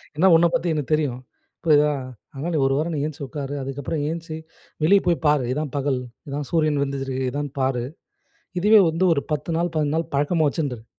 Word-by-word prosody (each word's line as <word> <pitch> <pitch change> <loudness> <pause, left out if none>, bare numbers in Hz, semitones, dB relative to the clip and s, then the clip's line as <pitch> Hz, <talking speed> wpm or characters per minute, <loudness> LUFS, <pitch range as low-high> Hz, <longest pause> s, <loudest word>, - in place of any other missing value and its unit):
ஏன்னா, 185 +5 +4
உன்னப் 170 +1 +4
பத்தி 175 - 0
எனக்கு 150 0 -3
தெரியும். 140 -5 0 0.4
புரியுதா. 150 -2 +4 0.4
அதனால, 150 +6 -4
நீ - - +2
ஒரு 135 - +1
வாரம் 165 +2 -1
நீ - - -1
ஏந்திச்சி 145 -2 -5
உட்காரு. 145 -2 -5
அதுக்கப்புறம் 140 +3 -3
ஏந்திச்சி, 165 -1 -5 0.5
வெளியே 195 +4 +5
போய் 170 -2 +2
பாரு. 145 -4 +3
இதான் 150 0 -3
பகல். 135 -2 0 0.3
இதான் 145 0 -4
சூரியன் 155 -3 +2
வந்துருக்குது. 135 -2 -3
இதான் 145 +1 -3
பாரு. 130 -2 0 0.8
இதுவே 210 +2 +7
வந்து 165 +4 +1
ஒரு 140 - +1
10 150 +3 -2
நாள், 175 0 -1
15 150 -1 +1
நாள் 165 0 -3
பழக்கமா 155 +2 +2
வச்சுண்டுரு." 135 -8 -3
150 Hz, 185 wpm, -23 LUFS, 140-165 Hz, 0.8 s, இதுவே